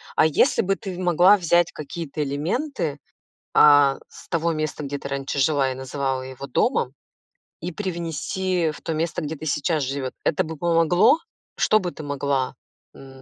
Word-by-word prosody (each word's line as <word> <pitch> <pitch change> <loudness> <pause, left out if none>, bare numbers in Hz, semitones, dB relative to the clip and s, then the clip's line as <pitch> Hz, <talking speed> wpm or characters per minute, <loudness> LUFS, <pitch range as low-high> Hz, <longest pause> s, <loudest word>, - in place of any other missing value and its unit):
а - - +5
если 160 - +3
бы 195 -2 0
ты 190 -2 -7
в - - -8
могла 180 +3 +5
взять 175 -1 +2
какие-то 155 0 -5
элементы, 160 - -2 0.6
а, 145 -2 +6
с - - -15
того 170 -1 0
места, 155 -1 -3
где 145 +1 -4
ты 140 - -7
раньше 140 0 -3
жила 135 -1 +2
и - - -3
называла 130 0 -3
его 130 +1 -8
домом, 140 - 0 0.7
и 175 - -5
привнести 175 -1 -2
в - - -12
то 165 - -3
место, 165 +2 -2
где 155 +1 -4
ты 155 - -9
сейчас 150 +1 0
живёт. 130 -1 -3
Это 185 +4 +1
бы 160 0 -7
помогло? 170 - +4 0.4
Что 215 - +3
бы 180 -3 -3
ты 155 - -9
могла, 140 -2 -1 0.4
м, 135 -1 -13
155 Hz, 175 wpm, -23 LUFS, 140-175 Hz, 0.7 s, а